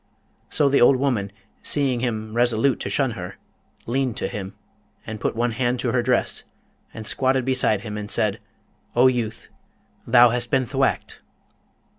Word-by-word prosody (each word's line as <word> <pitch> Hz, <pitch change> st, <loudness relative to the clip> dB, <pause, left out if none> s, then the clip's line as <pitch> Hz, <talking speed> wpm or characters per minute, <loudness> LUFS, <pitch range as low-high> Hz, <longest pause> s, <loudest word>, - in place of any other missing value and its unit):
So 145 Hz, -, +2 dB
the 140 Hz, 0 st, +3 dB
old 125 Hz, +3 st, +7 dB
woman, 125 Hz, -7 st, -1 dB, 0.3 s
seeing 135 Hz, -4 st, 0 dB
him 110 Hz, -3 st, -3 dB
resolute 120 Hz, +2 st, +2 dB
to -, -, -3 dB
shun 135 Hz, -3 st, 0 dB
her, 95 Hz, -3 st, -7 dB, 0.5 s
leaned 130 Hz, -1 st, -1 dB
to -, -, -1 dB
him, 100 Hz, -4 st, -6 dB, 0.5 s
and 110 Hz, -1 st, -6 dB
put -, -, -2 dB
one 120 Hz, +1 st, 0 dB
hand 120 Hz, +1 st, -1 dB
to 120 Hz, -, 0 dB
her 125 Hz, -, +2 dB
dress, 125 Hz, +1 st, 0 dB, 0.5 s
and 110 Hz, -1 st, -8 dB
squatted 130 Hz, +2 st, +1 dB
beside 125 Hz, -6 st, +2 dB
him, 105 Hz, -1 st, -6 dB
and 105 Hz, 0 st, -6 dB
said, -, -, 0 dB, 0.6 s
'O 120 Hz, +2 st, +5 dB
youth, 120 Hz, -4 st, 0 dB, 0.6 s
thou 120 Hz, -1 st, +7 dB
hast 120 Hz, 0 st, -2 dB
been 130 Hz, -1 st, +2 dB
thwacked!' 135 Hz, +2 st, -1 dB
120 Hz, 160 wpm, -23 LUFS, 110-130 Hz, 0.6 s, old